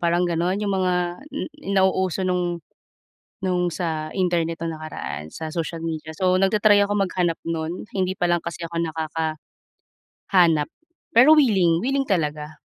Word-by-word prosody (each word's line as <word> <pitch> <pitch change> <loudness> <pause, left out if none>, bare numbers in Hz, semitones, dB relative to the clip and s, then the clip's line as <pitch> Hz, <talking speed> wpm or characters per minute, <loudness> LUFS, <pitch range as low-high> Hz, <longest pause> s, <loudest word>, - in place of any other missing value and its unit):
parang 175 +1 +2
gano'n. 175 +3 0
'Yong 205 -1 -1
mga 185 -1 +1 0.4
n 290 - -3 0.3
nauuso 190 -2 +2
no'ng 180 -2 -1 0.8
no'ng 180 -2 0
sa 160 -3 -3
internet 170 -3 0
no'ng 165 -1 -2
nakaraan 155 - -6
sa 160 - -5
social 165 0 -4
media. 160 -1 -4
So, 185 +2 +2
nagta-try 205 +2 +4
akong 205 0 -1
maghanap 175 -2 -1
no'n 165 +3 -4
hindi 185 -1 -1
pa 175 -1 0
lang 175 - +3
kasi 170 0 -5
ako 170 - -8
nakaka 160 -1 -2 1.0
hanap 165 -5 +5 0.5
pero 250 +7 +7
wiling, 190 - +4
wiling 270 +8 0
talaga. 155 - -2
175 Hz, 145 wpm, -23 LUFS, 165-190 Hz, 1.0 s, pero